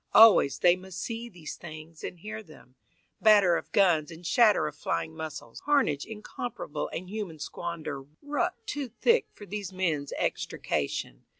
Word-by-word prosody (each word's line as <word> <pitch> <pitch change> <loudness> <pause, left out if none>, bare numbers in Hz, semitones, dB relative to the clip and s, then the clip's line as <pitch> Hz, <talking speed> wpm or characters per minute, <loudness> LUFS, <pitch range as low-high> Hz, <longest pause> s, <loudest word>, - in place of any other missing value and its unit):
Always 205 -11 +8
they 175 +3 +5
must 185 0 -9
see 230 +1 -4
these 170 -7 -8
things 155 0 -10
and - - -5
hear 215 +5 -6
them, 155 - -16 0.5
Batter 205 -5 +6
of - - -4
guns 170 -6 +4
and 170 +1 -11
shatter 215 -1 +5
of 150 -1 -4
flying 160 +1 -2
muscles, 155 -7 -7
Carnage 265 - +2
incomparable 220 -4 -5
and 180 +2 -5
human 200 -5 -5
squander 155 -3 -5 0.2
Rucked 355 +8 -1
too 290 -10 -3
thick 460 - +2
for 205 - -12
these 200 -1 -5
men's 165 -7 -1
extrication. 70 -4 -2
180 Hz, 155 wpm, -29 LUFS, 155-220 Hz, 0.5 s, Always